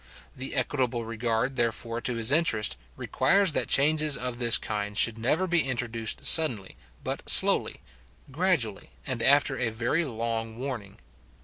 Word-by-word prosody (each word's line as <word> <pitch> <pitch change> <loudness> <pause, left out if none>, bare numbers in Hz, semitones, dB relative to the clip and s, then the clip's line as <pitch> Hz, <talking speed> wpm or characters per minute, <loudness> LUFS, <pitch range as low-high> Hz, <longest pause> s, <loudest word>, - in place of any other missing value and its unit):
The 130 +1 -5
equitable 125 -4 -2
regard, 115 +3 -2
therefore, 115 0 -2
to 125 - -3
his 115 +2 +2
interest, 115 - +1 0.2
requires 195 -2 +1
that - - -1
changes 150 0 +2
of 125 -1 -4
this 120 -2 +3
kind 105 -1 -5
should 115 0 +3
never 150 +11 0
be 175 -2 +4
introduced 120 -4 -3
suddenly, 120 - +5 0.3
but - - -5
slowly, - - +2 0.5
gradually, 145 - -1 0.2
and 130 -4 -3
after 140 0 +2
a 120 -3 -1
very 120 +9 -1
long 115 -3 -4
warning. 120 -7 -7
120 Hz, 140 wpm, -26 LUFS, 115-140 Hz, 0.5 s, suddenly